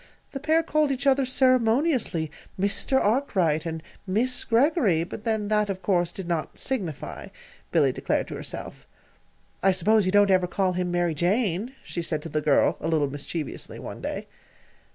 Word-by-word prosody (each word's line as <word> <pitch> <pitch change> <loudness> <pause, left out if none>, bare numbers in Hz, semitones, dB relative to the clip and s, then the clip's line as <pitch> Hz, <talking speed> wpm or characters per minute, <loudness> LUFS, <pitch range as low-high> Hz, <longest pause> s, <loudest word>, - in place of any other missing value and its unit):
The 275 - -5
pair 315 +3 +2
called 305 -3 +1
each 270 +1 -3
other, 270 -1 +3
ceremoniously, 255 - +2 0.3
"Mr. 200 +7 +2
Arkwright," 185 - +1
and 160 -1 -5 0.2
"Miss 235 +7 +1
Greggory" 235 - +2
but 195 +5 -8
then, 220 -2 0
that, 210 -1 +2
of 190 -1 -4
course, 175 -3 +1
did 185 0 -7
not 170 -3 -3
"signify," 195 - -3 0.4
Billy - - +3
declared - - -1
to - - -5
herself. - - -7 0.7
"I 195 - +4
suppose 190 +2 +3
you - - +2
don't 205 0 +5
ever 185 -1 +3
call 185 0 0
him 180 0 -1
'Mary 175 -1 +1
Jane,'" 200 - 0
she 170 - -4
said 155 -2 -2
to 165 - -6
the 155 0 -1
girl, 145 -1 +3
a 155 - -3
little 150 -4 +1
mischievously, 145 +1 -5
one - - -8
day. - - -4
195 Hz, 170 wpm, -25 LUFS, 170-255 Hz, 0.7 s, don't